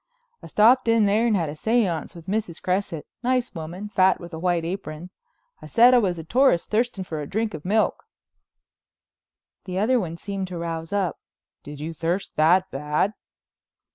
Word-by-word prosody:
"I - - -10
stopped 235 +4 +4
in 230 -2 +4
there 215 +4 +3
and 220 - +2
had 165 -5 0
a - - -5
séance 190 -2 0
with 170 -2 -11
Mrs. 195 -4 -3
Cresset, 180 -4 -2 0.2
nice 250 0 0
woman, 175 +5 -7
fat 190 -2 +3
with 170 -1 -10
a 160 - -5
white 175 -1 0
apron. 175 -1 -6 0.5
I - - -9
said 245 +2 +6
I 250 - +7
was 185 -6 0
a 165 - -6
tourist 245 - +2
thirsting 220 -3 0
for 160 -4 -5
a 145 - -6
drink 220 +1 -1
of 155 -2 -7
milk." 215 +4 +1 1.6
The 185 -1 -4
other 240 +6 +3
one 170 -5 -4
seemed 195 0 -4
to 180 -1 -6
rouse 165 -1 -4
up. 195 -4 -1 0.4
"Did 145 0 -10
you 160 +2 -5
thirst 170 +5 -2
that 175 +5 +3
bad?" 150 +8 0
185 Hz, 180 wpm, -24 LUFS, 165-215 Hz, 1.6 s, I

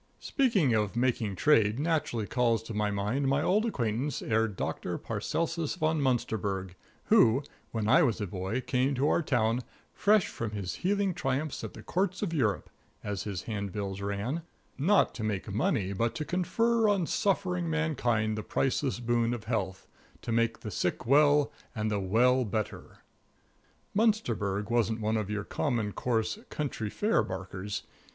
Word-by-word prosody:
Speaking 205 - +2
of 105 -1 0
making 120 -4 0
trade 110 -2 +4
naturally 145 -7 0
calls 115 -1 +1
to 115 - -7
my 105 0 0
mind 105 +8 -1
my 135 +2 +2
old 210 +5 +2
acquaintance, 125 - -1
Herr 110 0 +2
Doctor 100 -4 -3
Paracelsus 165 -2 -2
Von 155 -3 +1
Munsterberg, 100 -7 -1 0.3
who, 120 +5 +5 0.3
when 110 -2 -2
I 130 +9 +6
was 120 -9 +2
a 105 - -1
boy, 95 +6 -3
came 130 +2 +1
to 135 +3 +1
our - - +3
town 120 -5 +1 0.3
"fresh 210 -2 +3
from 115 -2 -5
his 100 -3 -3
healing 195 0 +1
triumphs 145 -2 -2
at - - -6
the - - -10
Courts 190 +2 -1
of 175 -5 -2
Europe," 115 - 0 0.3
as 105 -2 -3
his 95 -5 -4
handbills 100 -2 -4
ran, 100 +10 -2 0.3
"not 190 +9 +3
to 110 - -6
make 105 -2 -2
money, 100 -2 0
but 115 +4 0
to 155 - -3
confer 225 +6 +2
on 195 -4 +2
suffering 180 -2 0
mankind 125 -9 0
the 110 - -3
priceless 135 +3 0
boon 120 0 +1
of 115 - -8
health; 100 -5 -2 0.4
to - - -3
make 115 0 +1
the 105 - -5
sick 90 +5 -1
well, 145 +2 +5 0.2
and 110 -1 -1
the 105 - 0
well 120 +7 +3
better." 110 -1 -4 0.9
Munsterberg 115 - +1
wasn't 115 -1 +1
one 110 0 0
of 105 -2 -1
your 105 0 -2
common, 115 -4 -1
coarse, 115 - -1
county 130 -8 -3
fair 215 - +2
barkers. 95 +2 -5
120 Hz, 160 wpm, -29 LUFS, 105-150 Hz, 0.9 s, I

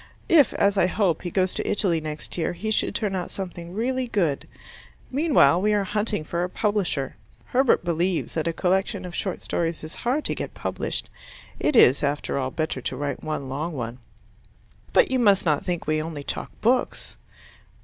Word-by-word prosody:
If, 300 -7 +6
as 200 0 +3
I 175 - +4
hope, 185 -4 +1
he 175 - -4
goes 185 +1 +1
to - - -2
Italy 175 -6 +2
next 155 -1 -5
year, 170 0 -1
he 215 +5 -3
should - - +1
turn 205 -4 0
out 180 -2 -3
something 175 -3 -6
really 250 +5 -1
good. 170 -11 0 0.6
Meanwhile 260 - +4
we 210 +1 +2
are 205 - +2
hunting 210 -2 -1
for 170 +3 -2
a 180 - -2
publisher. 195 - -1 0.3
Herbert 255 -7 +2
believes 170 +1 0
that 160 0 -1
a - - +2
collection 190 +3 0
of 180 - -7
short 185 0 -3
stories 165 -2 -2
is 155 +2 -7
hard 265 +6 0
to - - +1
get - - -5
published. - - -2 0.5
It 300 - +1
is, 135 - +7
after 145 -1 -1
all, 130 -1 -1
better 155 -2 -2
to 130 - -3
write 140 -1 -3
one 155 -3 -3
long 150 +6 -3
one. 120 -2 -5 0.9
But - - +4
you 260 - +2
must 200 -6 +4
not 150 -3 +2
think 175 -2 -2
we 155 0 +1
only 155 -2 -5
talk - - -4
books. 245 +3 +1
180 Hz, 190 wpm, -25 LUFS, 155-210 Hz, 0.9 s, is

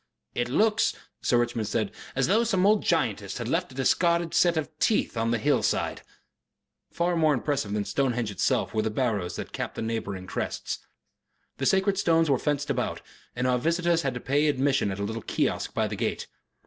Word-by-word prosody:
"It 120 0 -1
looks," 215 - +2 0.3
Sir 120 - +2
Richmond 120 -2 0
said, 105 -1 -1 0.2
"as 135 0 +2
though 220 +5 +3
some 195 -5 +2
old 210 0 +4
giantess 110 - 0
had 120 -2 -4
left 165 +3 -1
a - - -13
discarded 170 +5 +2
set 170 -1 +3
of 155 0 -3
teeth 215 - +1
on 115 0 0
the 120 - +2
hillside." 105 - +1 0.9
Far 175 +1 0
more 155 -3 +3
impressive 125 -5 -1
than 105 -1 -1
Stonehenge 120 -5 0
itself 100 - 0
were 110 - +1
the 110 - -1
barrows 105 -6 -1
that - - -6
capped - - -4
the - - -3
neighbouring 100 -4 -3
crests. 90 - -3 0.8
The 135 - 0
sacred 195 0 +2
stones 165 -4 +3
were 130 - +3
fenced 145 -1 -1
about, - - -2 0.3
and 125 +1 -1
our 125 -1 +2
visitors 170 +3 +1
had 135 -5 -2
to - - -3
pay 145 +4 +1
for 145 - +1
admission 135 -4 +1
at 95 - -4
a - - -2
little 110 +2 -3
kiosk - - -1
by - - +1
the - - -4
gate. - - -2
135 Hz, 200 wpm, -27 LUFS, 115-170 Hz, 0.9 s, old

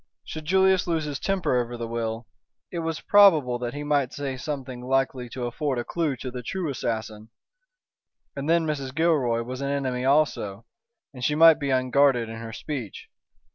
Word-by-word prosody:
Should 155 -1 -7
Julius 190 +2 +3
lose 165 -2 0
his 145 -3 -4
temper 165 -10 +1
over 120 0 -6
the 115 -1 -4
will, 115 0 -3 0.5
it 170 - -3
was 165 -1 -3
probable 155 -12 +5
that 120 +2 -4
he 145 - -4
might 145 -3 0
say 140 -2 -4
something 130 -2 -5
likely 130 -1 -1
to 125 0 -5
afford 130 +2 -2
a 120 - -1
clue 160 0 -1
to 130 +1 -6
the 125 0 -6
true 170 +5 -3
assassin. 110 -3 -4 1.1
And 140 +2 -4
then 165 0 +3
Mrs. 140 -4 -3
Gilroy 140 -8 +2
was 130 +2 -6
an 140 - -2
enemy 130 -3 -1
also, 130 -7 +1 0.5
and 125 -2 -9
she 150 +4 +1
might 160 0 +7
be 140 -2 -2
unguarded 130 -2 +3
in 115 - -7
her 115 0 -7
speech. 115 -1 -6
135 Hz, 180 wpm, -25 LUFS, 120-155 Hz, 1.1 s, might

